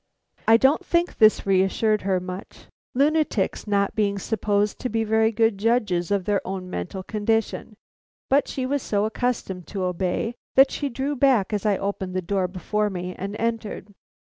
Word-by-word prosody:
I 225 - +7
don't 270 +9 +3
think 345 -1 0
this 215 -1 +5
reassured 195 +3 +2
her 190 -1 +1
much, 185 +1 -8 0.3
lunatics 290 -8 +1
not 200 -1 +1
being 200 -2 0
supposed 205 0 0
to 250 - -3
be 225 0 0
very 220 +1 +2
good 225 -2 +1
judges 210 -6 +1
of 200 -3 0
their 205 -1 +1
own 185 -1 -5
mental 90 - -5
condition, 220 +1 -1 0.5
but 280 +2 +3
she 260 - -3
was 280 +1 -1
so 205 -2 0
accustomed 220 -6 -2
to 195 -3 -4
obey, 180 +5 -1 0.2
that 270 +1 +7
she 285 - -2
drew 270 +4 -2
back 245 -7 +3
as 210 0 0
I 200 -2 +2
opened 195 -2 -4
the 185 - 0
door 190 +1 0
before 210 +4 -1
me 180 -1 -5
and 200 +2 -5
entered. 225 -2 -3
210 Hz, 170 wpm, -24 LUFS, 190-230 Hz, 0.5 s, I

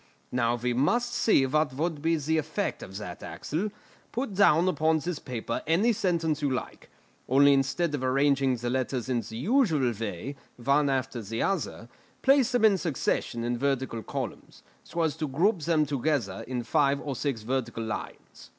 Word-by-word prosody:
"Now 120 -1 +1
we 120 +1 -1
must 240 - +1
see 175 - +3
what 140 0 +1
would 155 0 -2
be 165 +2 +2
the 160 +1 0
effect 155 +7 -3
of 95 0 -8
that, 90 -4 -7
Axel; 180 +8 -3 0.4
put 245 -3 -3
down 185 -3 +5
upon 160 -2 +2
this 165 0 -3
paper 115 -2 -4
any 195 +9 +3
sentence 170 -7 0
you 145 - +1
like, 130 -1 -5 0.4
only 140 +2 +6
instead 140 +4 +1
of 140 -3 -2
arranging 135 0 +2
the 120 0 -3
letters 130 -1 -2
in 120 -2 +1
the 110 - -8
usual 160 - +2
way, 110 +4 -5 0.2
one 140 +4 +2
after 130 -2 -1
the 110 +2 -3
other, 175 -11 -2 0.4
place 270 -2 +4
them 245 -3 +3
in 200 -3 +5
succession 130 -7 -1
in 120 0 -1
vertical 130 -4 -1
columns, - - -6 0.2
so 170 - -3
as 160 -3 +1
to 155 - -2
group 175 +9 +2
them 155 -1 +2
together 135 -8 -1
in 125 -1 -3
five 140 +1 +2
or 140 -2 -4
six 130 -5 -2
vertical 120 -1 -2
lines." 110 - -7
140 Hz, 175 wpm, -28 LUFS, 125-165 Hz, 0.4 s, only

